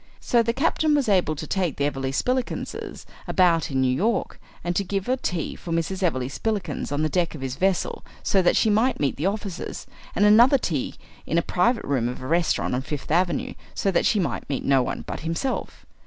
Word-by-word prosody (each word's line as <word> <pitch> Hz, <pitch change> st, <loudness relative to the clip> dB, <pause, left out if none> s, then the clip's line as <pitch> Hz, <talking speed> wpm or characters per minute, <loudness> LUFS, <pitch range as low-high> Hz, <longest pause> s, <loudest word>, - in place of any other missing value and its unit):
So 240 Hz, -, +3 dB
the 230 Hz, 0 st, +1 dB
captain 295 Hz, +4 st, +2 dB
was 285 Hz, -4 st, +1 dB
able 180 Hz, -6 st, +2 dB
to 155 Hz, -, -6 dB
take 180 Hz, -3 st, -1 dB
the 140 Hz, -, +1 dB
Everleigh 135 Hz, -2 st, -2 dB
Spillikinses 250 Hz, -, -2 dB, 0.2 s
about 170 Hz, -3 st, +3 dB
in 135 Hz, -2 st, 0 dB
New 130 Hz, -1 st, +2 dB
York, 225 Hz, -, -1 dB, 0.2 s
and 175 Hz, +1 st, -1 dB
to 200 Hz, -, +1 dB
give 195 Hz, 0 st, -3 dB
a 255 Hz, -, +2 dB
tea 180 Hz, -, -3 dB
for 170 Hz, -, -8 dB
Mrs. 165 Hz, +4 st, -1 dB
Everleigh 140 Hz, -9 st, +1 dB
Spillikins 205 Hz, +6 st, -3 dB
on 145 Hz, +2 st, 0 dB
the -, -, +3 dB
deck 170 Hz, +1 st, 0 dB
of 145 Hz, -, -8 dB
his 130 Hz, -1 st, -3 dB
vessel 190 Hz, +3 st, 0 dB, 0.2 s
so 195 Hz, -, +3 dB
that 175 Hz, -, +3 dB
she 220 Hz, -, +3 dB
might 235 Hz, +5 st, +2 dB
meet 140 Hz, -2 st, +1 dB
the 155 Hz, +7 st, -1 dB
officers, 200 Hz, -3 st, -4 dB, 0.3 s
and 205 Hz, -, +4 dB
another 235 Hz, +6 st, +7 dB
tea 155 Hz, -, -2 dB, 0.3 s
in 165 Hz, -, 0 dB
a 170 Hz, -, +3 dB
private 230 Hz, +6 st, +1 dB
room 130 Hz, -4 st, 0 dB
of 125 Hz, -, -6 dB
a 130 Hz, -, -8 dB
restaurant 165 Hz, 0 st, +1 dB
on 125 Hz, -, 0 dB
Fifth 145 Hz, +1 st, -5 dB
Avenue 175 Hz, +2 st, +1 dB, 0.2 s
so 195 Hz, -, +1 dB
that 180 Hz, -, +2 dB
she 215 Hz, -, +2 dB
might 180 Hz, -, -2 dB
meet 135 Hz, -, -2 dB
no 135 Hz, -1 st, +4 dB
one -, -, -3 dB
but -, -, -5 dB
himself. 165 Hz, +11 st, -3 dB
175 Hz, 215 wpm, -24 LUFS, 145-210 Hz, 0.3 s, another